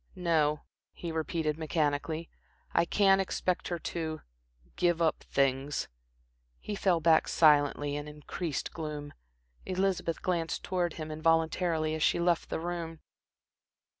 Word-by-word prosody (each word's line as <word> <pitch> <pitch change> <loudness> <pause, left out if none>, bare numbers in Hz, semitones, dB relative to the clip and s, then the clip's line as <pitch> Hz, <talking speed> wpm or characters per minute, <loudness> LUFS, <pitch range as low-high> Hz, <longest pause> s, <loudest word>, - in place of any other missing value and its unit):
"No," 155 -5 +1 0.3
he 170 - -5
repeated, 160 -1 -1
mechanically. 155 +1 -1 0.5
"I - - +4
can't 195 +1 +4
expect 185 -1 -1
her 175 - -2
to 160 -1 -4 0.5
give 175 -2 +2
up 165 -2 +1
things." 135 +1 0 0.7
He 210 - -5
fell 190 -4 +2
back 160 0 +4
silently, 145 -2 +4
in 145 0 -4
increased 150 +1 -4
gloom. 150 -3 -5 0.5
Elizabeth 185 -3 -1
glanced 170 -3 -1
towards 175 -3 -1
him 155 -1 -5
involuntarily 160 0 +1
as 160 - -3
she - - +3
left 170 -1 +1
the - - -2
room. 165 -1 -4
160 Hz, 125 wpm, -30 LUFS, 150-175 Hz, 0.7 s, I